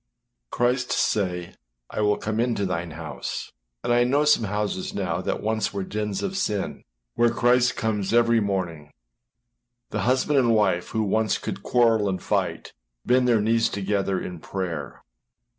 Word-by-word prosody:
Christ 125 +1 0
say, 90 -4 0 0.4
âI - - -1
will 105 -1 +2
come 110 +1 -3
into 115 -4 +1
thine 85 -2 -2
house.â 80 -1 -6 0.3
And 120 - +1
I 120 0 +4
know 140 +4 +2
some 150 -7 +4
houses 105 -2 -2
now - - -1
that - - -3
once 110 -1 -1
were 100 - -1
dens 105 0 -3
of 195 -1 -2
sin, 105 - -2 0.3
where 120 0 +3
Christ 125 +1 +3
comes 105 -3 -1
every 115 0 +4
morning; 90 -7 -3 1.0
the - - -2
husband 130 +3 +2
and 120 -3 +3
wife 95 -5 +2
who 110 -1 -1
once 110 +1 +1
could - - -5
quarrel 115 -4 +3
and 95 -1 -2
fight, - - -2 0.3
bend 125 0 +3
their 115 -3 +4
knees 115 +1 +2
together 100 -1 -1
in 90 -2 -6
prayer. 85 -6 -5
105 Hz, 160 wpm, -25 LUFS, 95-120 Hz, 1.0 s, I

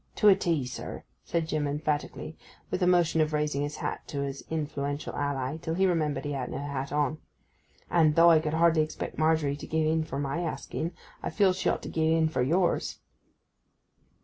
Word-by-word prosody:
'To 210 - +6
a 195 - +8
T, 165 -8 0
sir,' 125 0 -6 0.2
said 165 -2 -1
Jim 155 -2 0
emphatically; 150 +1 -2 0.4
with - - -1
a 180 - +3
motion 170 -3 +4
of 155 0 0
raising 150 -2 0
his 145 +1 -3
hat - - -3
to 140 - -3
his 140 0 -5
influential 145 -2 -3
ally, 140 0 -2
till 165 0 -3
he 190 +2 +3
remembered 155 -6 0
he 145 - -2
had 135 -3 -3
no - - -4
hat 140 -1 -4
on. 150 +1 0 0.7
'And, 155 -3 +4
though 170 +1 +7
I 160 - +6
could 155 0 -2
hardly 165 -1 +4
expect 155 0 -4
Margery 155 -3 +2
to 145 - -9
gie 160 -1 +1
in 160 0 +1
for 135 -3 -5
my 140 +3 -2
asking, 165 0 -3 0.3
I - - -2
feels 190 -3 +3
she - - +2
ought - - -1
to - - -5
gie 160 0 +2
in 160 -1 +3
for 155 - -1
yours. 170 +8 +1
155 Hz, 200 wpm, -28 LUFS, 145-165 Hz, 0.7 s, a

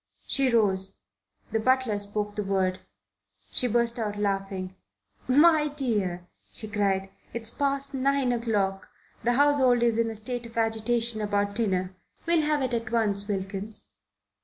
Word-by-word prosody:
She 270 -1 +2
rose. 195 -5 +1 0.5
The 225 - +1
butler 255 -3 +2
spoke 205 0 -4
the 210 - -2
word. 190 -1 0 0.7
She 250 - +2
burst 235 +1 +1
out 210 -2 -2
laughing. 195 -2 -2 0.5
"My 300 +3 +5
dear," 210 -12 -1 0.3
she 215 - -2
cried, 195 -2 0 0.2
"it's 225 -1 -1
past 275 0 +1
nine 270 -1 +1
o'clock. 205 -5 -1 0.4
The 240 +2 +2
household 265 -3 +4
is 230 -1 +2
in 230 0 +2
a 225 - -6
state 235 +2 -5
of 230 - -14
agitation 225 0 +2
about 205 -1 0
dinner. 190 -4 0 0.3
We'll 335 -1 +3
have 300 -2 +1
it 255 -1 -2
at 230 -1 -2
once, 205 -4 0
Wilkins." 195 +1 -4
225 Hz, 145 wpm, -27 LUFS, 200-250 Hz, 0.7 s, My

